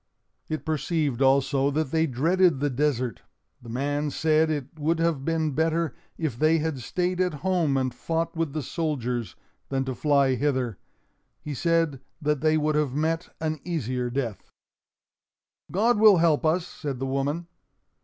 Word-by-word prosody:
It 155 - -3
perceived 150 -3 -1
also 135 +1 +3
that 145 -1 -1
they 160 0 +2
dreaded 165 +4 +2
the 145 0 0
desert. 130 -3 0 0.4
The 120 - -11
man 145 +5 -1
said 155 +2 +2
it 150 0 -4
would 160 +3 +1
have 165 -4 0
been 160 0 0
better 160 +2 0 0.2
if 145 -8 -3
they 155 +1 +4
had 155 -3 -2
stayed 180 +8 -1
at 180 -4 0
home 170 -7 +2
and 130 -2 0
fought 165 +5 -2
with 165 -4 -1
the 155 -2 -2
soldiers, 125 - -2 0.3
than 135 -1 -1
to 130 - -2
fly 140 -1 +3
hither. 130 -6 -1 0.6
He 150 - -6
said 165 -2 +1 0.2
that 150 -2 0
they 155 0 +3
would 155 0 +1
have 150 -3 0
met 160 +3 -1
an 155 -1 -2
easier 125 -8 -2
death. 120 -5 -4 1.2
"God 215 +5 +2
will 215 -3 +8
help 160 -2 +3
us," 170 +2 +1
said 145 -6 -5
the 135 - -3
woman. 140 +5 -1
150 Hz, 160 wpm, -26 LUFS, 135-165 Hz, 1.2 s, will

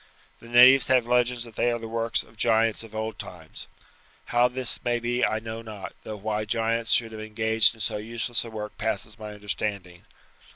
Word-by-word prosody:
The 115 - -14
natives 125 +3 +7
have 130 -3 +3
legends 125 0 +1
that 115 -2 -12
they 120 - +2
are 120 - -1
the 115 -1 -7
work 115 0 -1
of 110 - -21
giants 115 -1 +2
of 110 -1 -11
old 110 -1 -4
times. 85 -3 -9 0.6
How 120 +1 +3
this 125 0 -2
may 120 0 +1
be 120 +1 -1
I 110 - +2
know 110 +1 -6
not, 110 -3 -8
though 110 - -7
why 105 +1 -2
giants 115 +1 -1
should 115 -2 +2
have 110 -1 -7
engaged 110 0 +2
in 110 - -8
so 105 - 0
useless 115 +2 -2
a 115 - -8
work 105 -1 -7
passes 110 0 -3
my 105 -1 -7
understanding. 100 -3 -4
110 Hz, 200 wpm, -26 LUFS, 105-120 Hz, 0.6 s, natives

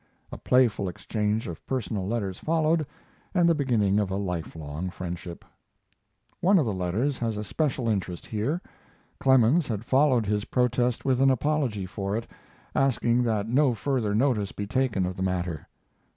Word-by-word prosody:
A - - -6
playful 115 -7 +2
exchange 105 +4 -2
of 85 - -7
personal 110 -7 -2
letters 100 -4 -2
followed, 160 -1 +1 0.5
and 175 -2 +4
the 170 - +5
beginning 115 -9 +2
of 100 -2 0
a 95 - -2
lifelong 85 -3 -4
friendship. 90 -1 -7 0.9
One 195 +3 +4
of 155 - +3
the 110 - -1
letters 100 +10 -1
has 115 -3 -1
a 105 - -3
special 125 - -1
interest 95 -5 -2
here. 130 +11 -2 0.6
Clemens 130 +4 +4
had 110 -1 -3
followed 130 -4 +3
his 105 0 -1
protest 125 0 0
with 130 -1 +2
an 135 - +6
apology 130 -6 0
for 100 +2 -3
it, 115 - -4 0.5
asking 125 -2 +2
that 110 -2 0
no 130 +1 +3
further 115 -4 -1
notice 110 -5 +1
be 100 - -5
taken 115 -4 0
of 90 0 -3
the - - -4
matter. 90 -4 -2
110 Hz, 160 wpm, -26 LUFS, 95-130 Hz, 0.9 s, an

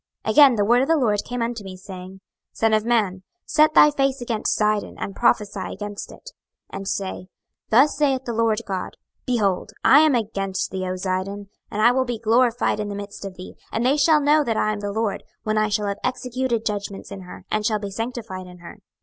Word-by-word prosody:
26:028:020 - - +1
Again 285 -4 +7
the 205 -2 +1
word 240 +3 +4
of 270 - 0
the 325 - +3
LORD 215 -7 +2
came 245 0 -4
unto 230 -2 -4
me, 190 -1 -8
saying, 185 -1 -9
26:028:021 190 0 -14 0.4
Son 225 -1 +2
of 215 0 +2
man, 205 -6 +1 0.2
set 305 0 +3
thy 300 - +8
face 275 -1 0
against 235 -3 -1
Zidon, 210 -1 0
and 195 - -5
prophesy 210 -5 +1
against 205 0 -7
it, - - -12 0.4
26:028:022 - - -4
And 195 0 -7
say, 190 -2 -3 0.4
Thus 265 +7 +5
saith 270 -3 +1
the 235 - -3
Lord 225 -1 +1
GOD; 190 -2 -4 0.3
Behold, 205 -5 0
I 285 - +8
am 310 -3 +4
against 195 -4 -2
thee, 185 -1 -3
O 185 - -2
Zidon; 190 +2 -3 0.2
and 215 +1 -1
I 240 - +7
will 260 +1 +1
be 240 -2 -3
glorified 230 +1 +2
in 210 -1 -3
the 200 - -5
midst 200 0 -8
of 195 -1 -7
thee: 185 - -10 0.2
and 230 +2 -1
they 265 +3 +4
shall 300 +1 +4
know 295 +1 +4
that 230 -5 -1
I 215 - +1
am 210 - -5
the 205 0 -3
LORD, 220 0 -1 0.2
when 215 0 0
I 215 0 +1
shall 210 0 0
have 200 0 -3
executed 250 -2 -2
judgments 200 -2 -4
in 200 -1 -7
her, 180 - -11
and 215 - 0
shall 215 0 +1
be 200 -1 -6
sanctified 225 -4 -5
in 180 0 -12
her. 175 +4 -12
215 Hz, 225 wpm, -23 LUFS, 200-245 Hz, 0.4 s, thy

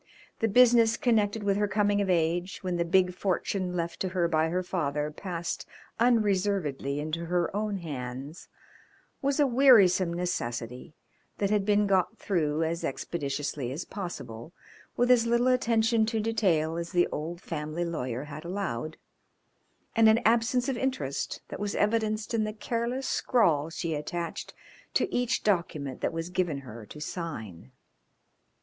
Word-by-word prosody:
The 225 - +2
business 235 0 +5
connected 220 -3 +1
with 200 -1 +1
her 205 0 +2
coming 205 0 +2
of 195 - -1
age, 175 +1 +1
when 180 -2 -1
the 170 - +2
big 180 +1 +3
fortune 185 0 -1
left 170 -1 -3
to 185 - -1
her 180 -2 +1
by 160 -1 +1
her 180 +2 -1
father 150 -4 -2
passed 175 0 -5 0.3
unreservedly 195 - +1
into 155 +3 -3
her 175 +2 0
own 210 -1 -1
hands, 140 -2 -6 0.7
was 280 +1 0
a 290 - +6
wearisome 230 -9 +5
necessity 125 -6 -4 0.4
that 200 0 0
had 205 -2 +2
been 210 0 +4
got 195 +2 +1
through 160 -5 0
as 165 +1 -2
expeditiously 145 -4 -3
as 150 +6 -5
possible, 170 - -7 0.4
with 245 +1 +3
as 235 -2 +5
little 235 +2 +3
attention 230 -3 +2
to 225 0 0
detail 180 -8 +1
as 170 0 -4
the 175 -1 +4
old 165 +3 -4
family 155 0 -4
lawyer 130 -6 -3
had 150 +1 -8
allowed, 170 -6 -4 1.0
and 225 -1 +6
an 220 +1 +5
absence 235 +3 +3
of 265 -3 -1
interest 255 - -2
that - - -6
was 205 -1 -2
evidenced 215 0 0
in 225 -1 +2
the 215 0 -3
careless 235 +4 -2
scrawl 165 - +2
she 165 0 -3
attached 165 +3 -4 0.4
to - - +1
each 245 -1 0
document 170 -9 -1
that - - 0
was 165 +1 -4
given 175 -7 -1
her 115 -4 -10
to 150 - -10
sign. 110 - -6
180 Hz, 155 wpm, -28 LUFS, 155-215 Hz, 1.0 s, a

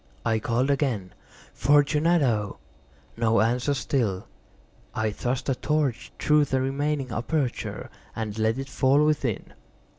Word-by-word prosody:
I 110 -1 +2
called 120 +5 +1
again— 125 -10 -1 0.4
"Fortunato!" 145 -5 +2 0.6
No 115 -2 +2
answer 120 +6 +1
still. 110 -6 -1 0.7
I 110 -1 0
thrust 125 +4 -3
a 135 - +2
torch 145 -2 -1
through 150 -1 +3
the 130 -1 0
remaining 135 0 -1
aperture 125 +2 -2 0.3
and 110 -2 -4
let 110 +2 +1
it 135 0 -4
fall 135 +3 +3
within. 140 -8 -1
130 Hz, 120 wpm, -26 LUFS, 115-145 Hz, 0.7 s, through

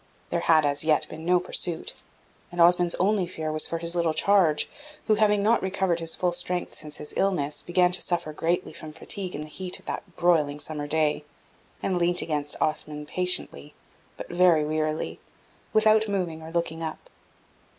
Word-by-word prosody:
There 170 - 0
had, 160 -2 +4
as 145 0 0
yet, 155 -1 +3
been 160 +1 -8
no 180 0 +5
pursuit, 175 -1 -2 0.6
and 175 - -7
Osmond's 175 0 +5
only 195 -1 +1
fear 160 -3 -4
was 155 0 +1
for 165 - -2
his 170 0 -2
little 170 -2 +1
charge, 180 -7 +3 0.4
who, 215 - +3
not 210 - 0
having 210 -2 +3
recovered 190 -5 +1
his 165 -1 -3
full 180 -1 0
strength 180 0 -2
since 150 -1 -8
his 150 - -5
illness, 150 -7 0
began 180 0 +2
to 180 - +1
suffer 170 -3 -2
greatly 170 +4 -1
from 155 -1 -9
fatigue 190 +2 -4
in - - -4
the 150 - -7
heat 180 +4 -3
of - - -19
that 180 -4 -6
broiling 155 -5 +2
summer 145 0 -5
day, 150 0 +1 0.6
and 185 -2 0
leant 175 +1 +2
against 150 -2 -3
Osmond 150 -1 -2
patiently, 180 -4 -1 0.4
but - - -7
very 175 -3 +4
wearily, 155 0 -2 0.5
without 215 0 +4
moving 180 -6 -2
or 160 - -8
looking 165 -1 -2
up. 160 -1 -6
170 Hz, 180 wpm, -26 LUFS, 155-180 Hz, 0.6 s, no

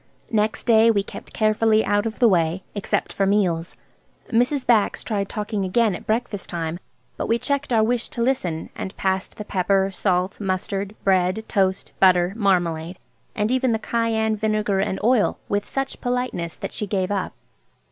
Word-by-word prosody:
Next 215 -1 0
day 230 -1 +5
we 205 -3 +2
kept - - -10
carefully 215 0 +2
out 205 +2 +1
of 220 - -6
the 245 - +5
way, 175 -2 +1
except 205 - -2
for 195 - +1
meals. 180 -5 0 0.5
Mrs. 250 +4 +1
Bax 225 -4 +2
tried 200 -3 -2
talking 210 -2 -3
again 210 +3 +2
at - - -8
breakfast 220 -2 -2
time, 165 0 -3 0.4
but - - -3
we 230 - +2
checked 280 +2 -2
our 225 -2 +4
wish 235 +1 0
to 235 - -2
listen, 185 -11 -1
and 190 - -6
passed 190 0 -1
the 210 - -6
pepper, 195 0 +1
salt, 185 0 0
mustard, 195 +1 -2
bread, 190 +2 +2
toast, 190 -3 0
butter, 180 -1 +4
marmalade, 175 -5 0 0.4
and 210 +2 0
even 255 -2 +2
the - - +2
cayenne, 220 -1 0
vinegar, 215 -2 0
and 195 -1 -1
oil, 235 -2 +3
with 205 0 -1
such 270 0 -3
politeness 245 -9 -2
that - - -6
she 210 - -3
gave 190 -1 -1
up. 195 -2 -2
205 Hz, 170 wpm, -23 LUFS, 190-225 Hz, 0.5 s, day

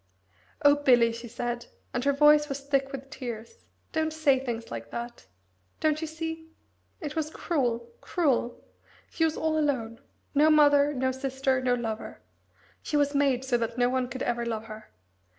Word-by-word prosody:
"Oh, 285 0 +6
Bill," 245 -5 +4
she 230 +1 -7
said, 240 +1 -4 0.3
and 245 - -1
her 280 - +4
voice 295 +1 +5
was 275 0 -4
thick 275 -1 0
with 275 0 -8
tears, 240 - -7 0.3
"don't 315 0 0
say 305 -4 +3
things 235 -3 -5
like 115 0 -6
that. 235 - -7 0.5
Don't 310 0 +1
you 320 - -2
see? 320 0 -6 0.5
It 300 -4 -5
was 310 -1 -1
cruel, 245 -8 -1
cruel! 270 -8 0 0.5
She 325 - +1
was 315 - -1
all 315 0 +1
alone 240 -7 -1 0.3
no 300 +2 +5
mother, 290 -1 +5
no 260 0 +1
sister, 265 0 -1
no 250 -1 +2
lover. 225 -2 -5 0.6
She 300 - -1
was 285 0 +2
made 275 -3 +2
so 245 -2 +1
that 230 +1 -3
no 245 0 +3
one 255 0 0
could 260 +1 -4
ever 240 0 -1
love 225 -2 -3
her. 215 0 -10
265 Hz, 170 wpm, -28 LUFS, 240-295 Hz, 0.6 s, Oh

